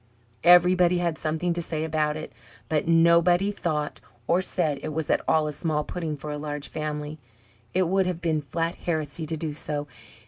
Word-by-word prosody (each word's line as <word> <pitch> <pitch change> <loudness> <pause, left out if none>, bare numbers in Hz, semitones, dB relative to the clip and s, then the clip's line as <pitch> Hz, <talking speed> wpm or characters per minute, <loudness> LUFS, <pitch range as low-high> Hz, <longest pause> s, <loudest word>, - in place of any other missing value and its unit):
Everybody 180 +1 +6
had 170 -2 -1
something 160 +3 -1
to 170 - -2
say 160 -1 -2
about 155 -1 0
it, 155 - -8 0.4
but 155 0 0
nobody 170 +3 +4
thought 155 -6 -3 0.2
or 175 +7 +2
said 155 -7 -1
it 155 - -4
was 160 0 -1
at - - +2
all 155 -1 +3
a 150 - -3
small 150 -1 -1
pudding 160 -2 -4
for 150 +2 -6
a 150 - -4
large 145 -1 -5
family. 150 0 -4 0.6
It 185 -1 +3
would 190 +1 +2
have 180 -2 -2
been 160 -3 0
flat 165 +4 -2
heresy 155 -1 -3
to 160 - -3
do 155 -1 -3
so. 145 -1 -4
160 Hz, 185 wpm, -26 LUFS, 150-175 Hz, 0.6 s, Everybody